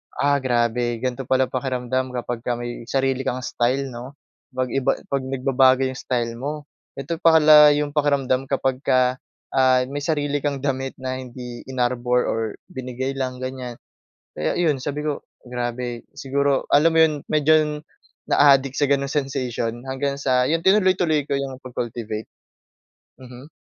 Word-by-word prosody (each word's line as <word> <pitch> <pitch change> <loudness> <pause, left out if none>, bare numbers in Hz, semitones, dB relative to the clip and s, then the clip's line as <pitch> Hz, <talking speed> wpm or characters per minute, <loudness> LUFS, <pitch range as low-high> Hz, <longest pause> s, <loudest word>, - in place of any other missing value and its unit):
"Ah 140 0 +2
grabe 120 -2 0
ganito 130 0 -3
pala 130 0 +2
pakiramdam 130 0 -2
kapagka 120 0 -3
may 120 -1 -6
sarili 135 -1 0
kang 125 +1 -2
style 130 +3 -1
'no 125 +3 -9 0.4
'pag 130 -1 -1
iba 135 +1 +1 0.2
'pag 140 - +1
nagbabago 130 0 +3
yung 130 -1 -3
style 120 -2 -2
mo, 145 +3 -4 0.3
ito 140 +5 -4
pala 150 -2 +7
yung 145 0 -1
pakiramdam 140 -3 +1
kapagka, 130 -1 +1 0.3
ah, 130 -1 +4
may 145 - -3
sarili 145 -1 -1
kang 140 -1 -3
damit 135 -1 -2
na 130 0 -4
hindi 125 -1 -8
inarbor 125 -1 0
or 115 - -1 0.3
binigay 130 +1 -4
lang." 130 -1 -3
ganyan. 130 -2 -5 0.6
Kaya 75 - -1
'yon 150 -7 +1
sabi 150 +2 -3
ko, 145 - -3 0.2
grabe, 120 -1 -4
siguro, 140 0 0
alam 155 +3 +5
mo 160 - +3
'yon, 160 -1 +5 0.2
medyo 155 0 +3 0.5
naadik 135 -2 +4
sa 145 - +1
'ganong 140 0 +1
sensation 130 -5 -2
hanggang 140 +1 -2
sa 130 -2 +2
yon, 160 +6 +1
tinuloy-tuloy 185 -4 +3
ko 140 0 -1
yung 135 -1 -4
pag-cultivate. 115 -3 -5 0.9
Mhm. 125 +2 -12
130 Hz, 145 wpm, -22 LUFS, 125-145 Hz, 0.9 s, pala